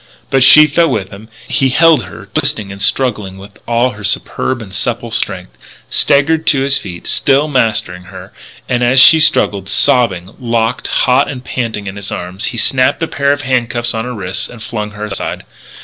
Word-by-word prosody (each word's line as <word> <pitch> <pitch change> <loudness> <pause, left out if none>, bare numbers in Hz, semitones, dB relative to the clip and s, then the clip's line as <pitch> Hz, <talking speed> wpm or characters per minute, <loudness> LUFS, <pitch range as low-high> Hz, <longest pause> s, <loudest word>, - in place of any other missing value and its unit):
But 135 - +2
she 150 +4 +8
fell 165 +3 +1
with 100 -7 -3
him; 105 +3 -13 0.2
he 135 - +1
held 160 - +3
her 90 - -12
twisting 100 -2 -2
and 100 0 -9
struggling 105 -5 -1
with 100 +1 -14
all 120 +2 +1
her 105 -2 -12
superb 120 +5 -2
and 100 -4 -11
supple 120 +3 -3
strength; 95 -4 -3 0.4
staggered 160 +3 +2
to 135 - +3
his 140 0 +2
feet, 90 -3 -9
still 140 +2 +2
mastering 110 -9 -1
her; - - -12 0.3
and, 125 -1 -1
as 130 +2 +3
she 160 +5 +8
struggled, 100 -10 +1
sobbing, 95 -6 +1
locked 115 -1 -2
hot 130 +2 +1
and 130 -3 -7
panting 115 -6 -4
in 95 0 -7
his 100 0 -5
arms, 90 +3 -4
he 120 - -4
snapped 130 +6 +1
a - - -1
pair 140 -2 0
of 145 0 -2
handcuffs 120 -2 -1
on 110 +1 -4
her 125 0 -6
wrists 95 -3 -3
and 120 -2 -11
flung 105 -2 -5
her 105 0 -7
aside. 100 -2 -5
120 Hz, 190 wpm, -13 LUFS, 100-135 Hz, 0.4 s, she